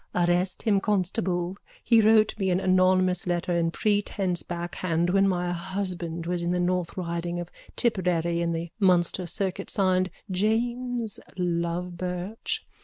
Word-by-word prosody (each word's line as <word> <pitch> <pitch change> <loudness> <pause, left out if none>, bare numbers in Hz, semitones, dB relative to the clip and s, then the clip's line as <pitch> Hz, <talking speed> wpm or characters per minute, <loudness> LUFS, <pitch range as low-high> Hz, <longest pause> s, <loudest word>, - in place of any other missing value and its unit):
_ 175 -1 +3
Arrest 180 +1 0
him, 210 -3 +3
constable. 185 -2 -1 0.3
He 230 -2 +5
wrote 215 0 +5
me 190 -1 +1
an 180 0 +2
anonymous 185 -1 +3
letter 175 0 0
in 165 -1 +2
prentice 200 -2 0
backhand 175 0 -2
when 195 +1 +4
my 180 -2 0
husband 175 -2 -4
was 175 0 -1
in 170 - -1
the 180 0 +1
North 180 0 -1
Riding 170 0 -3
of 175 0 -6 0.2
Tipperary 175 -6 +1
on 170 0 0
the 165 0 -3
Munster 180 -2 +3
circuit, 195 +2 -2
signed 185 -1 +2 0.2
James 235 +3 -1 0.2
Lovebirch. 180 +3 -2
180 Hz, 140 wpm, -26 LUFS, 175-195 Hz, 0.3 s, He